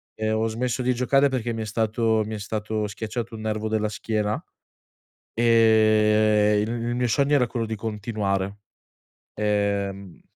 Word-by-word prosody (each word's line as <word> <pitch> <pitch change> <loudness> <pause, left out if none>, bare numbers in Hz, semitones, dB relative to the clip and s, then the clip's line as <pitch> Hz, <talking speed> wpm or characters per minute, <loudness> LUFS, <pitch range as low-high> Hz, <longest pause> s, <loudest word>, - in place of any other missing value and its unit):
e 110 0 -1
ho 110 +1 +1
smesso 125 +3 -2
di 125 0 +1
giocare 135 +3 +3
perché 120 -3 -2
mi 110 0 -3
è - - -5
stato 110 0 +1
mi 110 +1 -5
è 105 - -6
stato 110 +1 -3
schiacciato 110 +3 -5
un 110 - -8
nervo 110 0 -2
della 110 -1 0
schiena, 105 0 -2 0.9
ehm, 110 -2 +4
il 110 - -2 0.2
il 120 - -1
mio 125 0 +1
sogno 140 +4 +2
era 125 -4 +3
quello 115 0 -3
di 110 - -4
continuare. 100 -2 -2 0.8
Ehm 100 -3 -2
110 Hz, 155 wpm, -24 LUFS, 105-115 Hz, 0.9 s, ehm